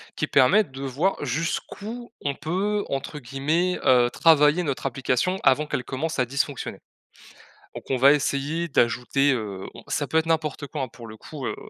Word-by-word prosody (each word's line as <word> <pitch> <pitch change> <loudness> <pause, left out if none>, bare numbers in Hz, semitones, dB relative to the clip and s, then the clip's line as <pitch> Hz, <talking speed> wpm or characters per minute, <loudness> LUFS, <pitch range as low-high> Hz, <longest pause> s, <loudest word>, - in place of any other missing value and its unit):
qui - - -1
permettent 160 +6 +4
de 135 +1 -7
voir 140 +9 0
jusqu'où 200 - -4
on 140 - 0
peut, 195 +8 -1
entre 135 +2 -4
guillemets, 150 +8 0
heu, 125 -1 +5
«travailler» 155 +3 +4
notre 140 -5 -3
application 135 +7 0
avant 145 +3 +3
qu'elle 125 - -2
commence 155 +6 -3
à 125 - +2
dysfonctionner. 140 +2 -3 0.9
Donc, - - -10
on 130 - +1
va 135 +3 +7
essayer 150 +3 -1
d'ajouter, 135 +1 +2
heu, 105 -6 -4
on - - -11
ça - - -1
peut 160 - 0
être 160 0 +1
n'importe 155 -3 -1
quoi, 145 -1 -4
hein, 130 - -3
pour 115 0 -12
le 110 0 -10
coup, 140 +1 -7
heu, - - -3
140 Hz, 180 wpm, -24 LUFS, 130-165 Hz, 0.9 s, va